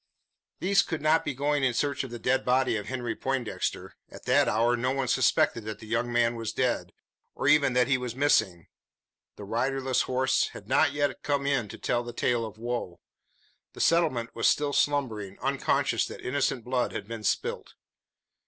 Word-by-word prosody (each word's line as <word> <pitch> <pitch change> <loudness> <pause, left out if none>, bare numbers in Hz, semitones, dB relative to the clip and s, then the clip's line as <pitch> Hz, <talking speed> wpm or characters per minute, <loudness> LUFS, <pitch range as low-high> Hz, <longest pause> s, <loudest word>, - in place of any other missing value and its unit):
These 195 +2 +3
could 160 -3 -4
not 155 +1 +3
be 145 - -3
going 145 +1 0
in 125 -3 +1
search 140 +1 0
of 135 - -7
the 120 - -6
dead 125 +3 +1
body 130 -1 +2
of 105 -1 -4
Henry 120 -3 -3
Poindexter. 130 -3 -3 0.2
At - - -13
that - - +4
hour 115 +3 +2
no 125 +2 -1
one 135 0 -1
suspected 120 -2 +2
that 110 -1 -5
the 110 - -12
young 115 +2 -1
man 120 0 +2
was 115 -2 -4
dead, 125 -1 -1 0.4
or - - -2
even 140 -4 +4
that 125 0 +3
he 135 -1 +2
was 125 -2 -5
missing. 110 - +2 0.7
The - - -10
riderless 130 +4 0
horse 130 +1 +1
had - - -11
not 145 -3 +3
yet 145 0 -1
come 140 -1 -1
in 135 -6 +1
to - - -9
tell 120 - 0
the 120 0 -8
tale 120 0 0
of 110 - -12
woe. 120 -6 -4 0.7
The - - -12
settlement 155 -9 +2
was 115 - +1
still 145 -1 +2
slumbering, 115 -11 0
unconscious 135 +1 0
that - - -9
innocent 130 -2 0
blood 125 +1 -1
had - - -5
been 115 -1 -7
spilt. - - -2
125 Hz, 190 wpm, -27 LUFS, 115-140 Hz, 0.7 s, that